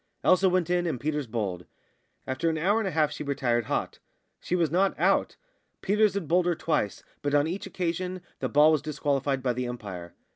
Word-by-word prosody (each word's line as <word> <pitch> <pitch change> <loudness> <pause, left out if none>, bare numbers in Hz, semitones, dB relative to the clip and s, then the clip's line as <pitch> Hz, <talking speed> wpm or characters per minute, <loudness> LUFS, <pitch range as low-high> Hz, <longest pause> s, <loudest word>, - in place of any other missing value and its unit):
Elsa 185 +1 +5
went 180 -2 +1
in, 175 -1 +1
and 140 -7 -2
Peters 150 0 -2
bowled. 100 -6 -3 0.6
After 130 +6 -1
an 160 - -1
hour 200 +8 +2
and 220 - -1
a - - +1
half 155 -3 +1
she - - -5
retired 120 -5 0
hot; - - -2 0.4
she 180 - -2
was 165 -4 +1
not 190 +3 +1
out. - - +2 0.5
Peters 210 0 +2
had 195 -6 -2
bowled 175 +3 +3
her 175 - +2
twice, 150 -11 -1 0.2
but 145 0 0
on 145 0 +4
each 175 +5 -4
occasion 180 +1 -3 0.2
the - - -2
ball 150 +2 +6
was 155 -3 +2
disqualified 140 -3 -1
by 125 -2 +1
the 125 +1 -3
umpire. 95 -8 -7
155 Hz, 205 wpm, -27 LUFS, 130-180 Hz, 0.6 s, ball